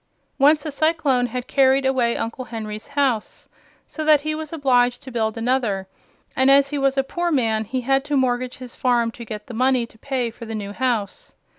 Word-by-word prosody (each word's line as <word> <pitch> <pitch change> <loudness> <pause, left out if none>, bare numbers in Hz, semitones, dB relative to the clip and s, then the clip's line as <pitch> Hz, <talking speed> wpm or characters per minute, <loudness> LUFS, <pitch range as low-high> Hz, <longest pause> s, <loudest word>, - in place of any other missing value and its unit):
Once 295 +2 +4
a 305 - -3
cyclone 285 -4 +1
had 250 +1 -5
carried 270 0 +3
away 255 -3 +1
Uncle 230 +3 -4
Henry's 215 -2 -7
house, 275 -6 -1 0.4
so 315 - -5
that 305 -2 +5
he 310 +1 -2
was 310 -1 -6
obliged 250 -5 +2
to 260 - -9
build 220 -2 -1
another; 230 -5 0 0.5
and 260 +1 +4
as 275 +1 +5
he 290 - -1
was 275 0 +1
a 270 - +3
poor 345 +5 -2
man 225 -6 +1
he 255 +4 -3
had 270 +2 +1
to 295 -1 0
mortgage 250 -1 0
his 250 -2 -10
farm 240 -2 +1
to 235 - -10
get 210 -2 -7
the 245 - -9
money 255 +1 +2
to 220 -1 -20
pay 255 -3 -2
for 230 +1 -10
the 225 0 -5
new 200 -2 -5
house. 245 - -2
255 Hz, 205 wpm, -22 LUFS, 230-275 Hz, 0.5 s, that